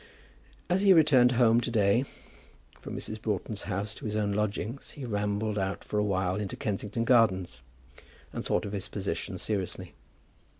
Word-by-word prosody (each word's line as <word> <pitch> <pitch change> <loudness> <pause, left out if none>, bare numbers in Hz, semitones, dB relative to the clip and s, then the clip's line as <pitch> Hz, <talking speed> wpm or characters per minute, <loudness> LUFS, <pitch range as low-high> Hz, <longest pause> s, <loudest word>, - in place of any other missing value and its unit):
As 185 +1 +2
he 200 -1 +7
returned 140 -7 +5
home 120 -1 +4
to 120 - -2
day 110 +2 +3 0.7
from - - -7
Mrs. 110 0 -4
Broughton's 105 0 -3
house 100 +2 -2
to - - -10
his 105 -1 -2
own 105 -1 0
lodgings 105 +5 -2
he 140 - -7
rambled 105 -1 -1
out 95 0 -2
for 105 - -2
a - - +2
while 95 -2 0
into 105 -2 -3
Kensington 105 +2 -2
Gardens, 95 - +3 0.7
and - - -4
thought - - 0
of 100 - -5
his 100 -2 -3
position 95 0 -4
seriously. 95 -1 -3
105 Hz, 165 wpm, -29 LUFS, 100-115 Hz, 0.7 s, he